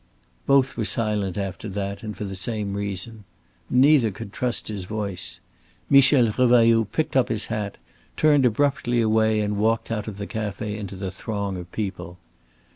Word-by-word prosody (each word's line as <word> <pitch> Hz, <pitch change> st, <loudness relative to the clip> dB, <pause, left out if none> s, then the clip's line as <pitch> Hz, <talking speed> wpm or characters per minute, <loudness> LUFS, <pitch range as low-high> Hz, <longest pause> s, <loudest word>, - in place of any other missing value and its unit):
Both 135 Hz, -1 st, +3 dB
were 115 Hz, -, 0 dB
silent 105 Hz, -4 st, -1 dB
after 100 Hz, +1 st, -4 dB
that, 100 Hz, 0 st, -4 dB
and 105 Hz, -2 st, -7 dB
for -, -, -4 dB
the 100 Hz, -1 st, -5 dB
same 100 Hz, +1 st, -3 dB
reason. 100 Hz, +2 st, -4 dB, 0.5 s
Neither 130 Hz, -2 st, +5 dB
could 100 Hz, 0 st, -9 dB
trust 125 Hz, -2 st, -1 dB
his 100 Hz, -4 st, -4 dB
voice. 100 Hz, -4 st, -4 dB, 0.5 s
Michel 135 Hz, -4 st, +6 dB
Revailloud 115 Hz, -3 st, +4 dB
picked 155 Hz, -, -1 dB
up 130 Hz, -, +3 dB
his 110 Hz, -2 st, +1 dB
hat, 105 Hz, -3 st, -3 dB, 0.4 s
turned 150 Hz, -3 st, +4 dB
abruptly 125 Hz, 0 st, +1 dB
away 110 Hz, -1 st, +2 dB
and 105 Hz, 0 st, -1 dB
walked 115 Hz, +2 st, 0 dB
out 105 Hz, -1 st, -3 dB
of 105 Hz, -2 st, -6 dB
the 100 Hz, -, -4 dB
café 105 Hz, -1 st, -4 dB
into 100 Hz, -2 st, -6 dB
the 95 Hz, 0 st, -4 dB
throng 100 Hz, 0 st, -4 dB
of 90 Hz, -1 st, -8 dB
people. 95 Hz, -4 st, -5 dB
110 Hz, 165 wpm, -24 LUFS, 100-115 Hz, 0.5 s, Michel